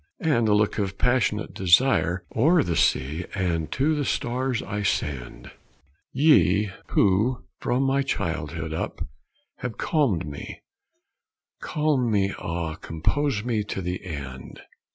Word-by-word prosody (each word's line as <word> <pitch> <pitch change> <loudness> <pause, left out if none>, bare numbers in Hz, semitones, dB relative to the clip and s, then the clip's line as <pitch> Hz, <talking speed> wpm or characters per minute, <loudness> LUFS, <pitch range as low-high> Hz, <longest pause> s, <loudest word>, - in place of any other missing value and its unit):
And 120 -8 +2
a 105 - +4
look 105 +1 +1
of 95 -2 -2
passionate 120 -4 +1
desire 95 -1 +3
O'er 155 +7 +4
the 85 - -1
sea 75 +7 +1
and 85 -5 -1
to 145 +4 +2
the 150 -1 0
stars 125 -1 -1
I 105 +1 -4
send: 65 -10 -3 0.6
"Ye 105 - +4 0.2
who 105 +5 +2 0.2
from 125 +2 0
my 135 +1 +2
childhood 80 - -3
up 80 - -4 0.5
have 120 -4 -5
calmed 130 - +1
me, 70 -1 -8 1.0
Calm 150 -5 +1
me, 100 -2 +1
ah, 85 -1 -3
compose 105 - -1
me 115 -3 0
to 100 - -4
the 90 0 -4
end! 70 -7 -7
105 Hz, 130 wpm, -25 LUFS, 85-130 Hz, 1.0 s, a